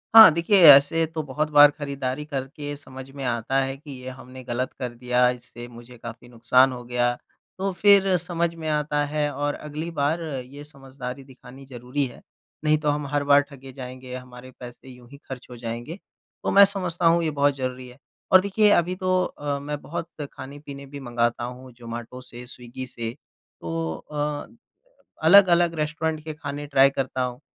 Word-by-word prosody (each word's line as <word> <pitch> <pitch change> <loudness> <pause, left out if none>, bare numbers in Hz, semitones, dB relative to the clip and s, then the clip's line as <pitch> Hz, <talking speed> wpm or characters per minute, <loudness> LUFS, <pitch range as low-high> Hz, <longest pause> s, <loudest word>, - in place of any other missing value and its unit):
हाँ, 220 -4 +12
देखिए 170 +4 +3
ऐसे 145 +3 +7
तो 160 0 -5
बहुत 150 +2 -2
बार 145 0 +8
खरीदारी 140 -1 -4
करके 145 0 -5
समझ 130 -2 -11
में 140 - -6
आता 120 +2 -1
है 135 0 -3
कि 145 +1 -12
ये 130 - -5
हमने 130 0 -11
गलत 125 +1 -3
कर 125 -2 -4
दिया 125 +1 +2
इससे 120 -1 -8
मुझे 120 0 -13
काफ़ी 120 +1 -10
नुकसान 125 +3 +3
हो 125 -1 -7
गया। 120 0 +1 0.4
तो 195 +1 -1
फिर 195 -2 +6
समझ 170 -1 -2
में 160 -1 -6
आता 150 -1 0
है 150 0 -1
और 145 +1 -1
अगली 155 +3 -6
बार 160 +4 +1
ये 140 -1 -7
समझदारी 135 -2 -9
दिखानी 130 0 -14
ज़रूरी 130 +2 -3
है, 125 - -10 0.4
नहीं 155 0 +3
तो 150 -1 -1
हम 145 -1 -1
हर 145 0 -1
बार 145 0 +5
ठगे 135 -1 -12
जाएँगे, 130 -1 -8
हमारे 125 0 -11
पैसे 125 +1 -11
यूँ 125 -1 -15
ही 140 - -12
खर्च 130 -2 -9
हो 120 - -10
जाएँगे। 120 - -6 0.4
तो - - 0
मैं 200 0 +8
समझता 180 -4 -2
हूँ 170 0 +4
ये 155 - 0
बहुत 145 -1 +2
ज़रूरी 130 -1 -5
है 125 - -16 0.3
और 185 - +8
देखिए 205 +2 +2
अभी 180 0 +2
तो 185 -1 +1
अ, 145 -1 -4
मैं 145 +1 -5
बहुत 165 +1 -5 0.3
खाने-पीने 140 +1 -10
भी 140 +1 -9
मँगाता 120 -2 -1
हूँ 125 +1 -8
जोमाटो 120 +1 -8
से, 125 -1 -11
स्विग्गी 125 +1 -8
से 115 -1 -6 0.5
तो 80 -1 -3 0.2
अ, 150 0 -3 0.8
अलग-अलग 175 -2 +6
रेस्टोरेंट 155 0 -2
के 155 - -5
खाने 145 -1 -6
ट्राय 140 -1 +5
करता 130 -1 -2
हूँ 125 0 -4
140 Hz, 185 wpm, -24 LUFS, 125-150 Hz, 0.8 s, हाँ